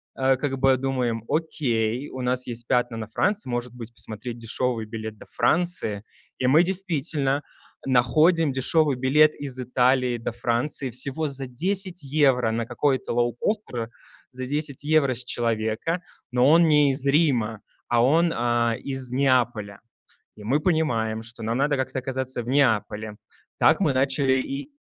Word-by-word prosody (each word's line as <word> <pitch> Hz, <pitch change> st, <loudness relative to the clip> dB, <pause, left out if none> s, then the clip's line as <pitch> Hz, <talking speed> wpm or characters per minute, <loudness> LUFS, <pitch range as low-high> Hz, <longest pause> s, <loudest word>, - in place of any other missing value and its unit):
э, 135 Hz, 0 st, +3 dB
как 135 Hz, 0 st, -3 dB
бы 135 Hz, 0 st, +4 dB
думаем: 125 Hz, -4 st, -1 dB
"Окей, 130 Hz, -6 st, -1 dB
у 130 Hz, -, -7 dB
нас 125 Hz, 0 st, -1 dB
есть 120 Hz, -1 st, -7 dB
пятна 120 Hz, -1 st, +1 dB
на 110 Hz, -1 st, -5 dB
Франции, 195 Hz, -, -1 dB
может 120 Hz, 0 st, -3 dB
быть, 120 Hz, -2 st, -9 dB
посмотреть 115 Hz, +2 st, -7 dB
дешевый 115 Hz, 0 st, -2 dB
билет 110 Hz, -1 st, -7 dB
до -, -, -13 dB
Франции?" 165 Hz, -, 0 dB, 0.3 s
И 130 Hz, -, -2 dB
мы 145 Hz, +6 st, +6 dB
действительно 160 Hz, -7 st, -1 dB, 0.5 s
находим 155 Hz, +6 st, +3 dB
дешевый 140 Hz, +2 st, +1 dB
билет 150 Hz, +4 st, +4 dB
из 135 Hz, -3 st, -6 dB
Италии 125 Hz, 0 st, +2 dB
до 115 Hz, -, -4 dB
Франции 120 Hz, +3 st, -2 dB
всего 140 Hz, +6 st, -3 dB
за 135 Hz, -1 st, -4 dB
10 180 Hz, +6 st, -2 dB
евро 135 Hz, -5 st, +2 dB
на 115 Hz, 0 st, -2 dB
какой-то 135 Hz, -4 st, 0 dB
лоукостер, 120 Hz, -, -1 dB, 0.4 s
за 130 Hz, 0 st, -6 dB
10 145 Hz, 0 st, -4 dB
евро 145 Hz, -4 st, +2 dB
с 125 Hz, +1 st, -7 dB
человека, 115 Hz, +8 st, -1 dB, 0.3 s
но 125 Hz, +1 st, +3 dB
он 165 Hz, +1 st, +6 dB
не 150 Hz, -2 st, +4 dB
из 135 Hz, 0 st, -2 dB
Рима, 130 Hz, -8 st, +2 dB, 0.3 s
а 120 Hz, -1 st, +3 dB
он, 165 Hz, +6 st, +3 dB
а, 120 Hz, -1 st, +1 dB
из 135 Hz, -2 st, -3 dB
Неаполя. 120 Hz, -6 st, +1 dB, 0.6 s
И 105 Hz, -, -12 dB
мы 135 Hz, +8 st, +1 dB
понимаем, 120 Hz, -10 st, 0 dB
что 115 Hz, 0 st, -11 dB
нам 115 Hz, +2 st, -1 dB
надо 145 Hz, +1 st, +2 dB
как-то 130 Hz, 0 st, -2 dB
оказаться 130 Hz, -1 st, -3 dB
в 120 Hz, -, -10 dB
Неаполе. 110 Hz, -5 st, +1 dB, 0.4 s
Так -, -, +4 dB
мы -, -, +2 dB
начали 135 Hz, 0 st, +2 dB
и 140 Hz, -, -6 dB
130 Hz, 155 wpm, -24 LUFS, 120-145 Hz, 0.6 s, мы